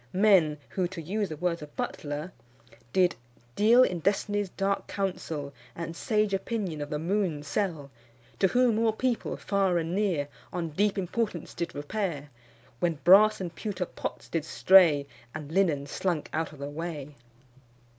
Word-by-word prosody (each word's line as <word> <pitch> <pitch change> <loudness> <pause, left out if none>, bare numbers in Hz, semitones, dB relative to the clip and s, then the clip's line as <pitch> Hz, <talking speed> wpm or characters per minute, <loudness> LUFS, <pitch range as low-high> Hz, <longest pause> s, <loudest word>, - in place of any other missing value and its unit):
Men 185 -7 +5
who, 185 -2 -1
to 175 -1 -8
use 195 +5 -2
the 155 - -6
words 170 0 -1
of 150 -1 -11
Butler, 150 +4 -4 0.6
did 180 -2 +3 0.4
"Deal 235 +4 +6
in 180 -8 0
Destiny's 205 +2 0
dark 195 +2 -1
counsel, 160 -7 -3 0.2
And 165 0 -5
sage 210 +1 0
opinion 195 -5 -2
of 145 - -4
the 150 - -2
moon 170 -2 -1
sell; 150 -3 -2 0.5
To 190 - +5
whom 240 +2 +3
all 225 -1 +2
people 245 +1 -1
far 195 -3 +1
and 165 0 -2
near 185 -8 0 0.2
On 170 -2 -3
deep 200 +6 +1
importance 190 -2 -2
did 170 -2 -4
repair, 145 -2 -3 0.5
When 170 -2 +1
brass 210 +4 +7
and 175 -3 -4
pewter 190 -1 -3
pots - - -6
did 165 -3 -2
stray, 160 -4 +5 0.3
And 150 -1 -7
linen 165 -6 +2
slunk 165 +2 -2
out 160 0 -1
of 150 - -13
the 140 +1 -5
way." 150 -2 -5
175 Hz, 155 wpm, -28 LUFS, 155-200 Hz, 0.6 s, brass